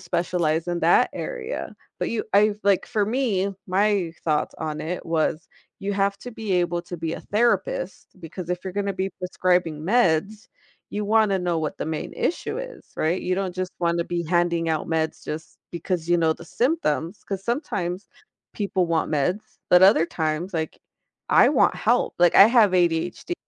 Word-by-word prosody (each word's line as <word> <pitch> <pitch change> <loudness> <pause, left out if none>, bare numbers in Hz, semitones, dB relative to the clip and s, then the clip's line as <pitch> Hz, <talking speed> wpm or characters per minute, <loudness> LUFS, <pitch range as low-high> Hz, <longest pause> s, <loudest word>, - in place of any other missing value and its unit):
specialize 170 -2 -1
in 175 0 -2
that - - +4
area, 485 -1 -5 0.2
but - - -1
you 230 - -2
I 205 +1 +4
like 200 -2 +2
for 215 -4 0
me, 205 -5 0
my 190 -2 +1
thoughts 155 -2 0
on 155 -1 -4
it 175 +3 -4
was: 160 -1 -1 0.3
you 200 +1 -3
have 200 0 +1
to 245 - -8
be 220 -4 -4
able 175 -1 +1
to 175 - -7
be 165 0 -3
a - - -5
therapist 240 - -1
because 170 +1 -8
if 180 0 -2
you're 185 - -4
gonna 200 -1 -2
be 190 0 -2
prescribing 180 -4 0
meds, 210 +2 +1 0.4
you 210 0 -3
wanna 210 -2 +3
know 175 -2 -1
what 155 -1 -3
the - - -4
main 160 -1 -4
issue 345 - -2
is, - - -8
right? 165 +4 0
You 185 - -1
don't 190 -2 -3
just 185 0 -3
wanna 170 -1 0
be 175 0 -2
handing 170 -1 +1
out 155 - -1
meds 160 -1 -1
just 155 +1 -7
because 170 -1 -3
you 175 - +4
know 160 -1 +3
the - - -13
symptoms, 220 - -1
'cause 195 -1 -5
sometimes 195 - -3 0.5
people 195 -3 0
want 165 -2 0
meds, 180 +8 0 0.3
but 180 +1 +6
other 190 -4 +6
times, 160 +3 -2
like, 160 -1 -3 0.5
I - - +6
want - - +3
help, - - +1
like 175 0 +4
I 195 - +10
have 225 -4 +4
ADHD, 175 - 0
180 Hz, 180 wpm, -24 LUFS, 165-205 Hz, 0.5 s, I